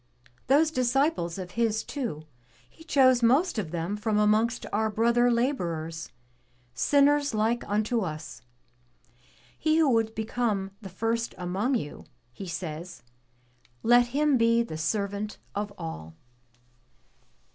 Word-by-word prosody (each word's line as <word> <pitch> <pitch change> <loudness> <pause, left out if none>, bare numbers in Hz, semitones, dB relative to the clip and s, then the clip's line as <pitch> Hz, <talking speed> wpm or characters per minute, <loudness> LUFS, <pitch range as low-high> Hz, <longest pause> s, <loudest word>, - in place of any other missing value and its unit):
Those 300 +5 +4
disciples 255 - +1
of 180 -2 -6
His 225 0 0
too. 235 - -5 0.4
He 320 - -18
chose 260 -6 +4
most 260 +5 +3
of 180 -7 -3
them 170 +4 -3
from 210 0 -1
amongst 215 +3 +2
our 220 +1 +1
brother 235 +3 +3
laborers, 170 - -1 0.6
sinners 285 - +3
like 225 +3 +1
unto 215 +3 +1
us. 155 - -6 1.2
'He 310 +1 +2
who 320 -3 +4
would 225 -1 +1
become 220 -3 -1
the 195 - -8
first 225 +5 -2
among 190 +9 -1
you,' 150 -11 -5 0.3
he 190 - -8
says, 170 -3 -6 0.8
'let 240 +1 +5
him 285 +1 +2
be 230 0 +4
the 230 - -7
servant 200 +6 -2 0.2
of 205 0 -3
all.' 80 0 -7
220 Hz, 125 wpm, -27 LUFS, 185-245 Hz, 1.2 s, let